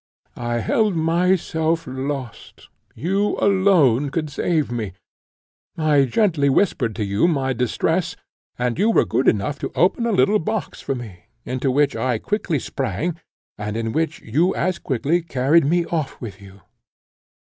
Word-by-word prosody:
I 120 -1 -1
held 215 - +1
myself 165 -1 +1
lost; 130 -1 -6 0.3
you 195 +6 0
alone 175 - +3
could 155 0 -3
save 155 -2 0
me: 110 -6 -3 0.8
I 150 -3 +3
gently 150 - +2
whispered 130 - +1
to 110 - -2
you 100 +10 +2
my 135 -5 0
distress, 125 -1 0 0.4
and 125 +4 -1
you 210 +3 +3
were 225 - +4
good 130 - 0
enough 140 +8 +1
to - - -4
open 195 +7 +2
a - - +1
little 210 +1 +3
box 215 +1 -3
for 135 - -2
me, 100 -8 -9 0.2
into 130 +1 -1
which 145 +2 +2
I 125 -3 0
quickly 185 - -1
sprang, 150 - -3 0.4
and 105 +1 -3
in 115 -1 -2
which 160 +4 -1
you 155 +11 +1
as 185 0 -1
quickly 145 +7 0
carried 150 0 +2
me 170 +3 +2
off 160 -5 -3
with 105 -4 -8
you. 100 0 -14
145 Hz, 150 wpm, -21 LUFS, 120-175 Hz, 0.8 s, were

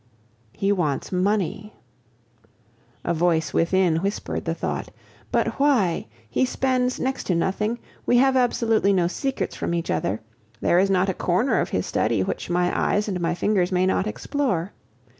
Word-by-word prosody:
"He 195 - 0
wants 155 -8 -1
money!" 200 +2 -1 1.3
A - - 0
voice 165 -1 +1
within 170 -1 +2
whispered 195 +5 -3
the - - -1
thought. - - -3 0.4
But - - 0
why? 245 - +2 0.2
He 115 - 0
spends 255 -1 0
next 265 0 -2
to 180 - +1
nothing; 210 +6 0 0.3
we 245 - +4
have 265 +1 +4
absolutely 225 -5 +2
no 180 -3 +2
secrets 270 +10 -2
from 170 - -2
each 170 - -2
other; 105 +3 -1 0.4
there 175 - +3
is 195 +1 +3
not 190 0 +2
a - - +1
corner 185 +10 +1
of - - -1
his - - -1
study - - +1
which - - -4
my 175 0 +1
eyes 210 +1 +1
and 185 -4 -2
my 170 +1 0
fingers 185 -1 +1
may 185 0 +2
not 190 +2 +1
explore. 215 - -2
190 Hz, 160 wpm, -24 LUFS, 175-230 Hz, 1.3 s, we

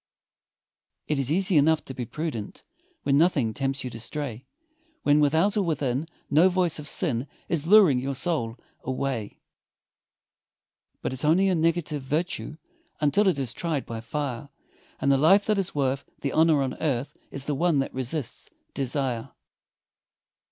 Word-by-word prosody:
It 150 -2 -1
is 135 +1 -1
easy 185 +1 +3
enough 155 +2 +3
to 130 - -7
be 125 -2 -4
prudent, 150 -9 -5 0.4
When 140 0 +3
nothing 145 -10 +2
tempts 135 +1 -2
you 125 - -5
to 115 - -8
stray, 130 0 -5 0.6
When 145 +1 +4
without 160 +8 +3
or 210 - +2
within 145 -4 -1 0.2
no 165 +6 +5
voice 180 -3 +1
of 150 - -5
sin 140 -8 0 0.2
Is 160 -2 0
luring 190 -10 +7
your 135 +2 -3
soul 130 -7 -1 0.3
away; 130 -4 -3 1.7
But - - -2
it's 130 - -4
only 175 +6 +4
a - - +2
negative 165 -3 0
virtue 155 +3 -2 0.4
Until 175 +8 +3
it 185 - +3
is 130 -4 -2
tried 160 -5 -2
by 115 -1 -6
fire, 140 +1 -4 0.5
And 140 - +2
the 135 - +4
life 190 +8 +5
that 215 -2 +2
is 190 - -3
worth 135 -1 0 0.2
the 140 - -1
honor 155 -2 +4
on 130 - -2
earth, 135 -4 -1
Is 140 -1 -5
the 150 - -1
one 165 +2 +2
that 135 - -1
resists 130 +1 -2 0.2
desire. 130 -3 -2
145 Hz, 160 wpm, -26 LUFS, 130-165 Hz, 1.7 s, luring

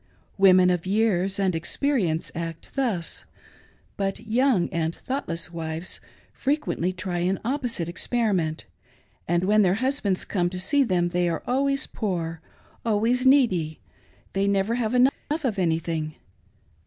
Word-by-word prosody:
Women 185 -2 +6
of 180 0 -1
years 195 -2 +1
and 195 -2 +1
experience 175 - 0
act 165 -1 -6
thus; 225 -11 -1 0.7
but 195 -1 -1
young 230 -4 +2
and 165 0 -1
thoughtless 175 -11 -4
wives 165 +1 -4 0.3
frequently 275 - -1
try 185 -1 -3
an 185 +2 0
opposite 245 - -1
experiment, 185 -4 0 0.6
and 175 +1 +1
when 210 +3 +4
their 185 -2 +3
husbands 255 -6 0
come 175 -3 0
to 180 0 -5
see 275 +10 +2
them 180 -7 +1
they 175 0 +1
are 165 - -3
always 275 +2 +1
poor, 165 -6 -3 0.4
always 230 +4 +2
needy 185 - +3 0.3
— - - -33
they 195 +1 +1
never 200 +2 +1
have 235 -1 0
enough 255 +2 +6 0.3
of 220 -7 -1
anything. 160 -2 -1
190 Hz, 135 wpm, -25 LUFS, 170-235 Hz, 0.7 s, Women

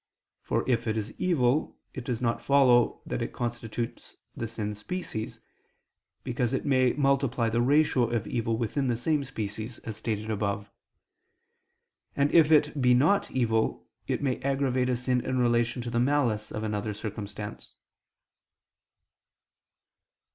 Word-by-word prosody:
For - - -1
if 120 -2 +1
it 110 0 0
is 110 0 -4
evil, 150 -5 +1 0.2
it 130 - -6
does 125 -1 -3
not 115 -1 0
follow 130 -4 +4
that - - -3
it - - -3
constitutes 120 -1 -5 0.2
the 115 - -3
sin's 105 -2 -4
species; 110 - -5 0.8
because 125 -1 -1
it - - -3
may 130 -3 +3
multiply 135 -5 +1
the 120 +1 +2
ratio 130 -2 +3
of 120 -3 -1
evil 115 -1 -1
within 130 +4 -1
the 120 -2 0
same 150 +4 0
species, 110 0 -5
as 110 - -5
stated 110 -1 -3
above. 100 -1 -2 1.4
And 140 +1 +2
if 160 -2 +5
it 150 -2 +4
be 125 -1 +5
not 160 +11 +3
evil, 115 -3 0 0.2
it - - -1
may 130 -3 0
aggravate 135 -2 +1
a 125 - +2
sin 125 0 0
in 130 - -1
relation 120 0 +1
to 120 - -5
the 120 - +1
malice 120 -5 +1
of 110 - -4
another 105 0 -2
circumstance. 105 -1 -7
120 Hz, 145 wpm, -28 LUFS, 110-135 Hz, 1.4 s, if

